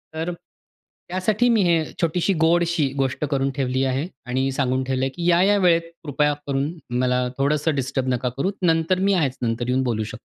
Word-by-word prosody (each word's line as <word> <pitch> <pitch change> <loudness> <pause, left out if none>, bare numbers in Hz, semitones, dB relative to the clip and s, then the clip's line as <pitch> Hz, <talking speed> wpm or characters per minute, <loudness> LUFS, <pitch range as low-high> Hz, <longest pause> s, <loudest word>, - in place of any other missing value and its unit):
तर 165 +2 -2
त्यासाठी 185 +5 -4
मी 230 -3 +3
हे 170 -2 +3 0.2
छोटीशी, 175 +3 +1
गोडशी 170 -2 +2 0.2
गोष्ट 135 +3 -2
करून 135 -1 +1
ठेवली 130 -1 0
आहे 135 +4 -1 0.2
आणि 130 +2 0
सांगून 130 -1 0
ठेवलं 130 0 -1
आहे - - -1
की 175 0 0
या-या 185 +4 +4
वेळेत 175 -3 +4 0.2
कृपया 150 0 +1
करून 140 +2 -1 0.3
मला 125 0 +1
थोडंसं 150 +2 +1
डिस्टर्ब 130 -1 -2
नका 125 +1 -1
करू. 185 +8 0
नंतर 165 +1 +2
मी 195 +1 +2
आहेच. 145 -8 0
नंतर 115 0 -1
येऊन 130 +1 +1
बोलू 115 -4 -1
शकतो. 110 - -9
145 Hz, 180 wpm, -22 LUFS, 130-170 Hz, 0.3 s, या-या